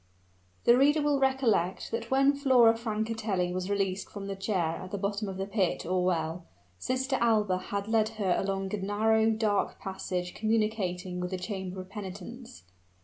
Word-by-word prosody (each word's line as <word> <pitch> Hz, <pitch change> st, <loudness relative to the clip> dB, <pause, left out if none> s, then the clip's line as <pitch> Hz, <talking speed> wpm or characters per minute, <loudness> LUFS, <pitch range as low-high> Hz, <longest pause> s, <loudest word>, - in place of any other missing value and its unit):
The 235 Hz, -, +6 dB
reader 290 Hz, +4 st, +4 dB
will 290 Hz, -1 st, +2 dB
recollect 255 Hz, -9 st, +1 dB
that 230 Hz, 0 st, -3 dB
when 275 Hz, +1 st, +4 dB
Flora 255 Hz, -5 st, +5 dB
Francatelli 220 Hz, -5 st, -2 dB
was 185 Hz, +1 st, -3 dB
released 195 Hz, -1 st, -1 dB
from 200 Hz, -1 st, -7 dB
the 195 Hz, 0 st, -4 dB
chair 190 Hz, -5 st, -1 dB
at 185 Hz, -, -8 dB
the 200 Hz, -, -3 dB
bottom 200 Hz, +1 st, -2 dB
of 190 Hz, -, -6 dB
the 190 Hz, -, -2 dB
pit 195 Hz, -3 st, 0 dB
or 180 Hz, +1 st, +1 dB
well, 170 Hz, -1 st, -1 dB, 0.3 s
Sister 260 Hz, -, -1 dB
Alba 210 Hz, -5 st, +3 dB
had 200 Hz, +2 st, -4 dB
led 220 Hz, -1 st, +2 dB
her 190 Hz, -4 st, +2 dB
along 195 Hz, 0 st, -2 dB
a -, -, 0 dB
narrow, 220 Hz, +3 st, +2 dB
dark 215 Hz, -2 st, 0 dB
passage 185 Hz, -2 st, -4 dB
communicating 210 Hz, -5 st, -1 dB
with 180 Hz, 0 st, -2 dB
the 185 Hz, -, -3 dB
chamber 190 Hz, -1 st, -5 dB
of 185 Hz, 0 st, -8 dB
penitence. 210 Hz, +5 st, -8 dB
205 Hz, 170 wpm, -29 LUFS, 185-225 Hz, 0.3 s, The